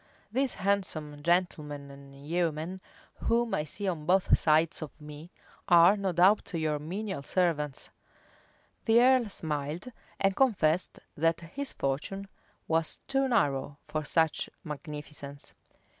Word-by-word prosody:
These 260 +2 0
handsome 185 -7 -1
gentlemen 150 -4 0
and 140 0 -13
yeomen, 170 +2 -1 0.4
whom 235 0 +1
I 150 - +1
see 200 +6 -4
on 160 -5 -3
both 185 +1 +5
sides 160 +2 +2
of 155 - -8
me, 150 +2 -10 0.4
are 175 +2 +7
no 195 -2 -1
doubt 185 +2 +3
your 155 -2 0
menial 190 +2 -4
servants." 150 -3 -1 0.9
The 230 0 +5
earl 250 -2 +5
smiled, 155 - -3 0.3
and 195 -1 +2
confessed 185 -10 +2
that 165 +2 +1
his 270 - -5
fortune 170 +9 -3 0.4
was 160 0 0
too 270 0 +1
narrow 145 - +1
for 155 0 -2
such 160 0 +1
magnificence. 150 -2 -8
165 Hz, 125 wpm, -29 LUFS, 150-195 Hz, 0.9 s, are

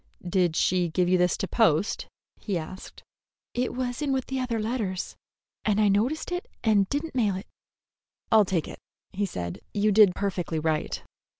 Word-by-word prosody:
"Did 175 -2 +2
she 180 0 +2
give 180 +2 +1
you 185 0 +3
this 180 0 +2
to 195 - -2
post?" 205 -4 +2 0.3
he 200 -4 -2
asked. 180 +4 -8 0.5
"It 245 0 -1
was 250 +1 -2
with 270 -3 0
the 265 0 -3
other 245 -3 -1
letters, 215 -5 -2 0.5
and 210 -1 +2
I 210 -1 +4
noticed 240 - +1
it 355 +1 -3 0.2
and 205 -3 +3
did 290 +3 -1
n't 320 - -9
mail 215 -7 +2
it." 190 +4 -6 0.9
"I'll 220 -1 +7
take 180 -4 -1
it," - - -9 0.3
he 200 0 -1
said. 85 - -5 0.2
"You 210 +1 +3
did 205 -3 +6
perfectly 185 -5 -2
right." 155 0 -1
200 Hz, 175 wpm, -27 LUFS, 180-240 Hz, 0.9 s, I'll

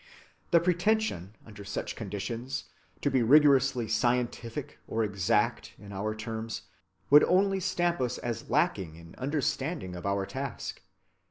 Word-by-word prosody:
The 170 - +6
pretension, 175 - 0
under 105 -2 -11
such 100 0 -4
conditions, 115 +5 -4 0.4
to - - +1
be 130 -1 +3
rigorously 135 -2 +5
"scientific" 120 +4 -1
or 115 0 0
"exact" 105 +3 0
in 100 0 -11
our 105 +3 -2
terms 110 +1 -5 0.5
would 145 +1 +9
only 195 +1 +3
stamp 175 -3 0
us 125 -2 -1
as 120 -1 -4
lacking 105 - +1
in 85 0 -13
understanding 135 - -2
of 90 +2 -5
our 100 0 0
task. 135 +4 -5
120 Hz, 135 wpm, -29 LUFS, 105-150 Hz, 0.5 s, would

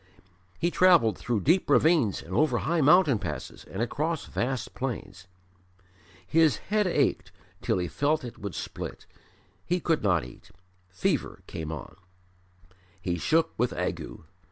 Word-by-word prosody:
He 170 - 0
travelled 170 - +5
through 115 0 -2
deep 170 - +2
ravines 155 - +3
and 90 - -9
over 155 +9 +2
high 165 0 0
mountain 150 - +5
passes 85 -7 -6
and 100 +5 -3
across 155 +6 -2
vast 125 -1 -3
plains. 100 -8 -5 1.0
His 155 - +3 0.2
head 210 -2 +3
ached 175 - 0 0.3
till - - 0
he 90 -1 -1
felt 145 - 0
it 120 - -8
would 100 -3 -6
split; - - -6 0.6
he 180 +1 0
could 165 -2 0
not 90 - +2
eat; 60 - -14 0.4
fever 90 +1 -2
came 80 -1 -6
on. 80 +2 -8 1.0
He 90 -2 -2
shook 160 - +2
with 125 +1 +1
ague. - - -4
125 Hz, 140 wpm, -27 LUFS, -, 1.0 s, travelled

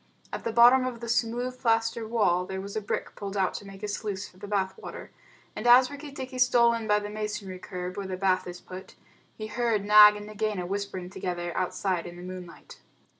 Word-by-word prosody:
At - - -4
the 230 - -1
bottom 245 +3 +6
of 245 -2 -5
the 235 - -7
smooth 245 +2 -1
plaster 225 -1 +1
wall 205 -6 +2
there 190 0 -4
was 200 +1 -7
a 215 - -1
brick 205 - -3
pulled 200 0 -5
out 190 -2 +1
to - - -7
make 195 +1 -12
a - - -1
sluice 205 -1 -4
for 185 - -20
the 205 - -9
bath 195 -2 0
water, - - -9 0.4
and 215 - -3
as 250 +2 +7
Rikki 285 0 -8
tikki 260 -2 -7
stole 240 -2 +5
in 230 -1 -3
by 210 0 +4
the 205 0 -3
masonry 210 -3 -5
curb 180 -1 -6
where 200 -1 -4
the 185 -1 -4
bath 185 -1 +1
is 175 0 -8
put, 185 0 -10 0.4
he 215 - -5
heard 215 -1 0
Nag 210 0 +9
and 210 0 -7
Nagaina 210 -3 -2
whispering 190 -1 -4
together 175 -2 -4
outside 185 -1 -1
in 175 - -9
the 175 - -9
moonlight. 180 -1 -10
210 Hz, 220 wpm, -27 LUFS, 190-230 Hz, 0.4 s, Nag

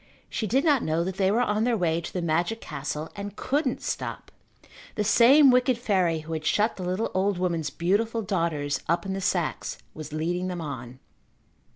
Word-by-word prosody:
She 220 - -2
did 265 +8 +2
not 290 -5 +4
know 160 +2 0
that 190 +1 -4
they 190 -1 +3
were 230 +5 +3
on 210 -1 0
their 240 -1 +2
way 170 -3 +1
to - - -7
the 180 - -3
magic 170 +7 0
castle 150 0 -5
and 200 0 -6
couldn't 290 +7 -1
stop. - - -4 0.6
The 210 - 0
same 260 +6 +7
wicked 250 0 +3
fairy 185 -8 +1
who 160 +1 -7
had 155 -1 -3
shut 210 +7 +2
the - - -8
little 185 +5 -1
old 190 0 +1
woman's 170 -5 -1
beautiful 220 +9 0
daughters 165 -7 -1
up 170 +4 +1
in 190 - -2
the 195 - -3
sacks, 175 -8 -1 0.2
was 155 -1 -8
leading 175 +4 -1
them 180 -1 -4
on. 130 -6 -6
185 Hz, 195 wpm, -26 LUFS, 160-215 Hz, 0.6 s, same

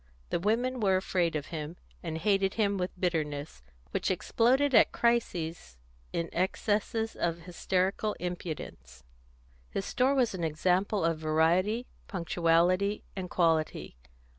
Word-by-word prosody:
The - - +1
women 240 +7 0
were 195 -4 +3
afraid 180 -3 0
of 145 -2 -2
him, 155 +2 -5 0.2
and 160 -2 -4
hated 195 +1 +1
him 205 -3 +1
with 180 0 -1
bitterness, 150 - -2 0.3
which - - -1
exploded 265 +4 +2
at - - +6
crises 170 - -1 0.3
in 170 0 -2
excesses 215 +4 0
of 170 0 -1
hysterical 185 +4 -1
impudence. 170 - -6 0.7
His 195 - -3
store 265 +2 +2
was 250 -5 +2
an 180 -3 -4
example 180 +5 +1
of 165 -1 0
variety, 170 +9 +2 0.2
punctuality, 180 +2 +1
and 185 -2 -5
quality. 165 - 0
180 Hz, 125 wpm, -30 LUFS, 165-210 Hz, 0.7 s, at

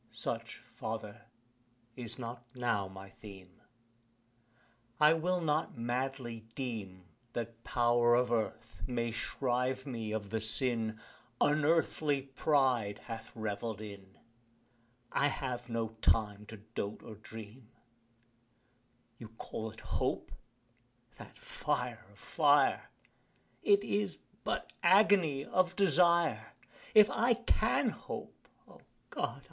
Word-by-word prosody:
Such, - - -4
father, 110 +1 -5 0.7
is 120 -3 -6
not 120 -1 -6
(now) 115 -6 0
my 95 0 -11
theme 95 -4 -13 1.4
I 150 +1 +7
will 180 +3 +1
not 155 -4 0
madly 120 -1 -3
deem 105 -8 -5 0.3
that 115 0 -5
power 120 0 +4
Of 125 0 +2
Earth 110 -5 -2
may 120 -2 -1
shrive 125 +2 -1
me 115 -5 -4
of 105 -2 -3
the 110 - 0
sin 110 -1 0 0.4
Unearthly 150 -1 +2
pride 130 -6 +2
hath 115 -1 -7
revell'd 110 0 -3
in 100 -2 -10 0.9
I 140 - +3
have 125 -3 -3
no 115 -1 -1
time 105 -1 +2
to 110 - -9
dote 105 0 -5
or - - -8
dream: 110 +2 -11 1.5
You 115 - -8
call 110 0 -6
it 110 0 -13
hope - - -2 0.9
that - - -12
fire - - -2
of - - -21
fire! - - +3 0.7
It 405 -1 +4
is 205 -2 0 0.3
but - - -2
agony 185 -6 +5
of 185 0 +1
desire: 170 - +3 0.4
If 210 -1 +10
I 235 +1 +3
can 245 - +2
hope - - -8 0.2
O - - -17 0.3
God! - - -2
120 Hz, 110 wpm, -33 LUFS, 110-145 Hz, 1.5 s, If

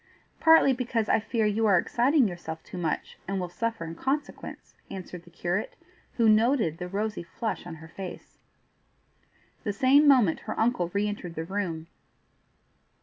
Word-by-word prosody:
"Partly 320 -4 +6
because 235 -3 -1
I - - +3
fear 225 0 -1
you 215 +1 +2
are 195 -3 +5
exciting 250 - +3
yourself 170 -3 -6
too 180 - -8
much 160 -3 -3
and 195 0 -1
will 180 -1 -3
suffer 225 +1 -3
in 165 - -6
consequence," 275 - -4 0.2
answered 180 -2 -8
the - - -15
curate, 175 +3 -3 0.4
who 235 - 0
had 220 -1 +7
noted 220 - +2
the 180 - -4
rosy 210 +3 -2
flush 190 +2 -4
on 170 - -7
her 160 0 -12
face. 185 +2 -9 1.2
The 205 - -1
same 270 +7 +5
moment 245 - +5
her - - -3
uncle 225 -7 +1
re 200 +2 0
entered 180 -5 -5
the 160 - -3
room. 175 -4 -3
205 Hz, 165 wpm, -27 LUFS, 175-235 Hz, 1.2 s, had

